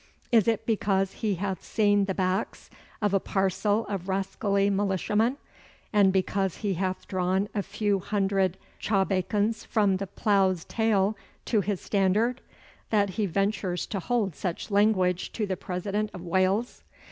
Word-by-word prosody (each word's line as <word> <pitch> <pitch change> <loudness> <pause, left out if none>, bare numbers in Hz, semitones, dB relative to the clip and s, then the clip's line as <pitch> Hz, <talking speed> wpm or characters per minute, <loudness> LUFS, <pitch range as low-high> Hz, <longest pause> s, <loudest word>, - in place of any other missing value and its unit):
Is 230 -3 +4
it 225 -2 +1
because 195 -3 +1
he 210 -3 -1
hath 190 +1 -3
seen 205 -2 +2
the 190 -1 -2
backs 185 +2 -2 0.3
of 205 -1 +2
a 195 - +4
parcel 200 +3 0
of 195 -2 -5
rascally 195 +1 0
militiamen, 205 - +1 0.6
and 200 -2 +5
because 190 0 0
he 200 - +1
hath 185 +1 -3
drawn 185 +1 0
a 205 - 0
few 205 0 -1
hundred 195 -2 0 0.2
chawbacons 205 +2 0
from 200 -3 +2
the 195 +1 -4
plough's 190 -3 +1
tail 215 -2 +1 0.3
to 215 -4 +2
his 200 -1 -2
standard, 210 +6 +1 0.5
that 205 -3 +2
he 205 +2 -1
ventures 195 -1 -1
to 200 - -4
hold 210 -4 -1
such 180 +5 -4
language 190 -3 +2
to 215 - -1
the 190 -2 -2
President 200 +4 -3
of 180 - -8
Wales? 190 +6 0
195 Hz, 145 wpm, -27 LUFS, 190-210 Hz, 0.6 s, and